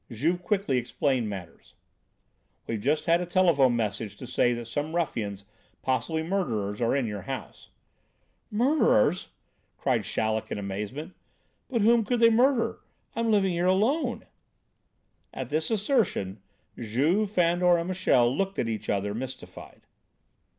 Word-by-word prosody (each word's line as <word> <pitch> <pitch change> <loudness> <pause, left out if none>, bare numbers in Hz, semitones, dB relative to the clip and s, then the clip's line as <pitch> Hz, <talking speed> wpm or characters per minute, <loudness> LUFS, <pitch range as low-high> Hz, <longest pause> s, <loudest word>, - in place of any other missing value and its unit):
Juve 155 +10 -1
quickly 195 -10 0
explained 125 -1 -1
matters. 90 -5 -9 0.9
"We've 115 - -3
just 150 +6 0
had 170 +1 +3
a - - -2
telephone 165 -9 +4
message 105 -2 -3
to 125 - -8
say 120 0 +2
that 120 0 -5
some 145 +7 -3
ruffians, 105 - -2 0.4
possibly 160 +5 -1
murderers, 115 - -2
are 115 +3 +2
in 135 -3 +1
your 105 -2 -4
house." 135 -4 -7 0.8
"Murderers!" 215 - +2 0.5
cried - - 0
Chaleck 110 0 -1
in - - -2
amazement. 105 - -5 0.6
"But 235 -5 0
whom 230 +1 +5
could 245 +2 0
they 230 0 +6
murder? 245 +1 +2 0.4
I'm 230 0 0
living 200 -3 +3
here 175 +1 0
alone." 230 - +1 1.1
At - - -5
this 155 +1 -1
assertion, 200 - 0 0.4
Juve, 145 - +1
Fandor 175 -1 +3
and 170 +1 -3
Michel 135 -10 +2
looked 195 +3 -2
at 115 - 0
each 110 -1 -4
other, 100 +1 0
mystified. 130 +3 -8
155 Hz, 135 wpm, -27 LUFS, -, 1.1 s, they